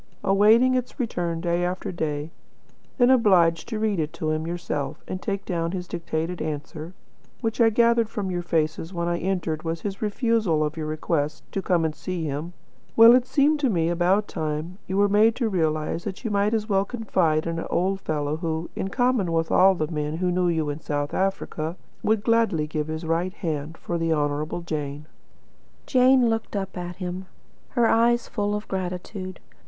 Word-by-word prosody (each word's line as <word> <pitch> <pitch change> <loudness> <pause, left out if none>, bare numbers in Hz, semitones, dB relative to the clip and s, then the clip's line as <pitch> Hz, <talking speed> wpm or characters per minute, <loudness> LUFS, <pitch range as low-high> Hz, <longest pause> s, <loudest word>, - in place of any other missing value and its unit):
awaiting 215 +6 +5
its 255 +2 -2
return 175 -9 -2
day 175 +1 0
after 180 +1 -2
day, 155 -2 -3 0.7
then 245 -1 +5
obliged 180 -9 +4
to 225 - -3
read 215 -4 0
it 155 -1 -1
to 155 -1 -2
him 155 +1 -2
yourself, 155 -4 -4
and 185 - -5
take 200 -2 -3
down 170 -2 -2
his 180 -1 -4
dictated 170 0 -3
answer, 155 +3 -5 0.5
which 225 -1 -1
I 225 - +7
gathered 235 0 +3
from 200 -4 -3
your 175 -1 -1
faces 165 -1 -1
when 170 0 -1
I 170 0 0
entered 170 -4 -1
was 165 0 -3
his 195 -1 -5
refusal 215 - +1
of 150 0 -2
your 155 -2 -4
request 155 -1 -2
to 195 - -2
come 175 -4 +1
and 155 - -1
see 180 +1 -4
him, 155 +3 -4 0.4
well, 230 +1 +9
it 250 0 +3
seemed 295 +2 +3
to 275 -3 +2
me 165 -5 +1
about 180 +4 +2
time 160 +3 -4
you 190 - -2
were 205 0 +5
made 215 +3 +4
to 240 -4 0
realise 160 -2 -1
that 190 +2 -5
you 225 - -1
might 205 +2 +2
as 215 -1 -1
well 195 -2 +2
confide 185 -9 0
in 165 0 -2
an - - -5
old 190 +2 0
fellow 150 -1 -2
who, 160 0 -3
in - - -2
common 245 -5 +1
with 165 0 0
all 190 +1 +6
the 155 -1 -2
men 150 0 -2
who 180 +1 0
knew 180 0 +1
you 160 -3 0
in 145 - -6
South 145 -2 -3
Africa, 185 -3 -2 0.2
would 215 -1 +1
gladly 225 -9 +2
give 150 0 -3
his 160 +1 -4
right 170 +4 -1
hand 160 -4 -4
for 170 -1 -3
the 165 0 0
Honourable 150 +2 -1
Jane." 150 -3 -4 0.8
Jane 255 -1 +5
looked 225 -1 -2
at 180 -3 -4
him, 185 0 -5 0.5
her 235 - +5
eyes 235 +1 +3
full 205 -2 -1
of 210 +1 -5
gratitude. 185 0 -5
175 Hz, 190 wpm, -25 LUFS, 160-210 Hz, 0.8 s, well